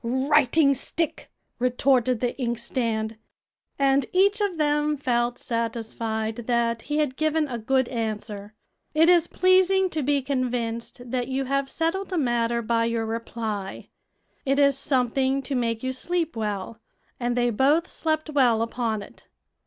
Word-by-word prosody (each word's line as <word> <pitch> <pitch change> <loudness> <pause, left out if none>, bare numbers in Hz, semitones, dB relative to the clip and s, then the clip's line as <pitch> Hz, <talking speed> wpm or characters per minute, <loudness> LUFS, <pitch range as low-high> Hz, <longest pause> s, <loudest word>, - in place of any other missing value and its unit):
"Writing 275 +3 +3
stick!" 325 +4 -3 0.3
retorted 250 -1 +2
the 245 -1 -1
inkstand. 230 -2 -2 0.6
And 275 -1 +2
each 400 +3 +3
of 395 -5 0
them 295 0 +1
felt 240 -2 0
satisfied 225 -2 -3
that 235 -1 +1
he 295 +4 -3
had 295 -4 0
given 310 0 +1
a 240 -3 -4
good 260 +3 +1
answer. 215 -3 -4 0.4
It 325 +2 +5
is 345 -2 +5
pleasing 375 +1 +3
to 310 - -1
be 280 0 +1
convinced 245 -2 -3
that 250 -2 -1
you 265 +1 -2
have 275 +1 -1
settled 360 +6 -2
a 365 - -1
matter 235 -4 +1
by 230 +1 +1
your 230 -1 -1
reply; 220 -3 -5 0.5
it 275 0 +1
is 280 -1 +5
something 265 0 0
to 280 - -4
make 230 -2 -1
you 260 - -1
sleep 335 +2 -2
well, 210 0 -4 0.4
and 240 -1 -1
they 240 0 +2
both 280 +9 +3
slept 310 -1 -2
well 245 -6 +3
upon 230 -3 -2
it. - - -16
255 Hz, 145 wpm, -25 LUFS, 230-295 Hz, 0.6 s, It